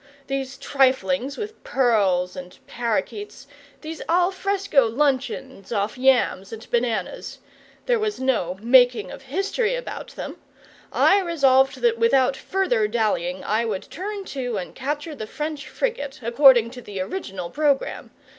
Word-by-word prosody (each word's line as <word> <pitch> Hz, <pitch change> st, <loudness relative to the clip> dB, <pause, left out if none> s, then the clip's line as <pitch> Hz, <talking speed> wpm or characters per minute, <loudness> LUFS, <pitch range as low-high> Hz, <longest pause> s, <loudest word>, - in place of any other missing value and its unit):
These 270 Hz, 0 st, -4 dB
triflings 270 Hz, 0 st, +1 dB
with 430 Hz, +1 st, -7 dB
pearls 205 Hz, -, +2 dB
and 180 Hz, -1 st, -9 dB
parrakeets, 270 Hz, -, -3 dB, 0.4 s
these 315 Hz, +1 st, -7 dB
al 355 Hz, +2 st, +3 dB
fresco 385 Hz, -, +1 dB
luncheons 260 Hz, -4 st, -1 dB
off 205 Hz, -1 st, -1 dB
yams 250 Hz, -7 st, +2 dB
and 225 Hz, -1 st, -9 dB
bananas 235 Hz, -5 st, -2 dB, 0.5 s
there -, -, +2 dB
was 425 Hz, -1 st, -2 dB
no 225 Hz, -9 st, 0 dB
"making 245 Hz, -4 st, +4 dB
of -, -, -9 dB
history" 395 Hz, -, -1 dB
about -, -, -6 dB
them, -, -, -6 dB, 0.5 s
I 400 Hz, -, +4 dB
resolved 270 Hz, -6 st, +3 dB
that 235 Hz, -1 st, +2 dB
without 255 Hz, +3 st, +3 dB
further 260 Hz, -, 0 dB
dallying 205 Hz, -5 st, -1 dB
I 220 Hz, +2 st, +1 dB
would 215 Hz, -5 st, -4 dB
turn 400 Hz, +2 st, -5 dB
to 245 Hz, -5 st, -3 dB
and 180 Hz, -, -6 dB
capture 295 Hz, +4 st, -4 dB
the 220 Hz, -7 st, -7 dB
French 300 Hz, +2 st, -5 dB
frigate, 285 Hz, -, -3 dB
according 235 Hz, -1 st, +6 dB
to 250 Hz, 0 st, -9 dB
the 205 Hz, -4 st, -7 dB
original 185 Hz, -, -5 dB
programme. 290 Hz, -3 st, 0 dB
265 Hz, 135 wpm, -23 LUFS, 225-305 Hz, 0.5 s, according